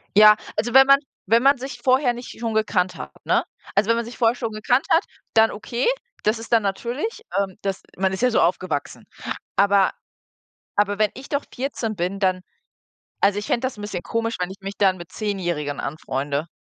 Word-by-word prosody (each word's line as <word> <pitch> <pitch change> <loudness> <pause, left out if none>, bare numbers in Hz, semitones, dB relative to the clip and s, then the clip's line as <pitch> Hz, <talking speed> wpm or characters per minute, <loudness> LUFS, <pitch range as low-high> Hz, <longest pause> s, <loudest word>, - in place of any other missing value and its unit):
Ja, 210 0 +9 0.2
also 240 +1 -1
wenn 270 0 +8
man 275 0 +8 0.3
wenn 230 +4 +5
man 275 0 +5
sich 245 -1 -7
vorher 255 -1 +3
nicht 240 -1 -9
schon 230 -1 -2
gekannt 210 -4 +1
hat, - - -7
ne? - - +3 0.3
Also, 200 +3 +2
wenn 230 - +5
man 235 - -2
sich 240 - -9
vorher 230 -1 +3
schon 230 -2 -3
gekannt 245 +5 +1
hat, 330 - +5 0.3
dann 225 0 +6
okay, 235 - -2 0.4
das 215 +2 +2
ist 230 +1 -6
dann 230 - +6
natürlich 245 - -3 0.2
ähm, 195 -2 -2
das 195 -1 -2 0.2
man 190 0 +1
ist 190 - -4
ja 250 - +4
so - - +3
aufgewachsen. 170 -4 -1 0.5
Aber 200 -1 +4 0.9
aber 205 0 +2
wenn 215 -1 +3
ich 265 +2 -10
doch 285 -1 -1
14 245 -4 -3
bin, 185 +2 -2
dann 185 -2 +2 0.8
also, 200 +1 +3
ich 205 - -4
fände 235 - +1
das 255 - -5
'n - - -8
bisschen 195 -4 -4
komisch, 230 0 -2
wenn 180 +1 -1
ich 190 - -9
mich 195 +1 -6
dann 190 -2 +3
mit 175 +1 -10
zehnjährigen 175 -9 -2
anfreunde. 140 +1 -3
215 Hz, 200 wpm, -23 LUFS, 190-240 Hz, 0.9 s, Ja